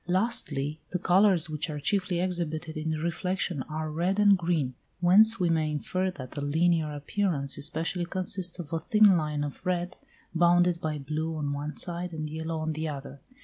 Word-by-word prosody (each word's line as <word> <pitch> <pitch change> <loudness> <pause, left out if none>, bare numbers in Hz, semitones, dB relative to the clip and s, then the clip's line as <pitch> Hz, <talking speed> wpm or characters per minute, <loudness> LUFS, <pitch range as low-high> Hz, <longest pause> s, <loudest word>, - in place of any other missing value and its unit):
Lastly, 160 -7 0
the 180 - -1
colours 185 -1 +3
which 155 0 -3
are 150 -1 -4
chiefly 185 +1 0
exhibited 170 -3 -2
in 155 +1 -3
reflection 170 0 -2
are 155 0 -3
red 175 +5 0
and 205 -1 +6
green, 165 -7 -1 0.3
whence 205 +5 +6
we 180 - +2
may 160 -2 +1
infer 185 +5 -1
that 130 -8 -8
the 145 - -5
linear 160 +1 +1
appearance 145 -1 0
especially 165 +4 0
consists 180 -1 -2
of 165 -3 -8
a 165 - 0
thin 210 +3 +5
line 150 -3 -1
of 145 +2 -6
red, 180 -1 -2 0.4
bounded 175 0 +3
by 155 -1 -2
blue 155 +3 -3
on 145 -2 -2
one 145 +2 -5
side 175 0 -2
and 155 -1 -5
yellow 160 +1 -4
on 155 0 -2
the 155 +1 -3
other. 140 -1 -8
165 Hz, 180 wpm, -28 LUFS, 155-180 Hz, 0.4 s, and